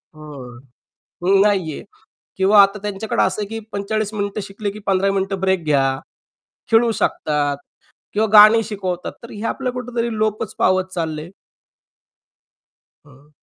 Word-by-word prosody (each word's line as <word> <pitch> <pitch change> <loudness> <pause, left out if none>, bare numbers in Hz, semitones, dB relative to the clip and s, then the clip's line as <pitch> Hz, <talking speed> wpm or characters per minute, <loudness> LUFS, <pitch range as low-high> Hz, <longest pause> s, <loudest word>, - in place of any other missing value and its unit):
हो. 140 -6 -10 0.6
नाहीये. 195 -4 +2 0.5
किंवा 200 +2 +6
आता 200 +1 +1
त्यांच्याकडे 210 +1 -1
असं - - 0
आहे - - -3
की 225 +1 -5
45 210 +1 -2
मिनिटं 200 0 -3
शिकले 200 +1 -5
की 205 - -10
15 195 0 +2
मिनिटं 195 0 -1
ब्रेक 190 -3 +1
घ्या, 145 -3 +2 0.9
खेळू 230 +1 +4
शकतात 145 -2 0 0.6
किंवा 215 +1 +1
गाणी 215 +1 +8
शिकवतात. 190 -5 -4
तर 235 - -11
हे 210 - -8
आपलं 260 +1 -2
कुठेतरी 240 -2 -3
लोपच 215 -1 -1
पावत 185 0 +3
चाललयं. 160 -1 -4 1.8
हं. 140 +1 -20
195 Hz, 130 wpm, -20 LUFS, 175-215 Hz, 1.8 s, गाणी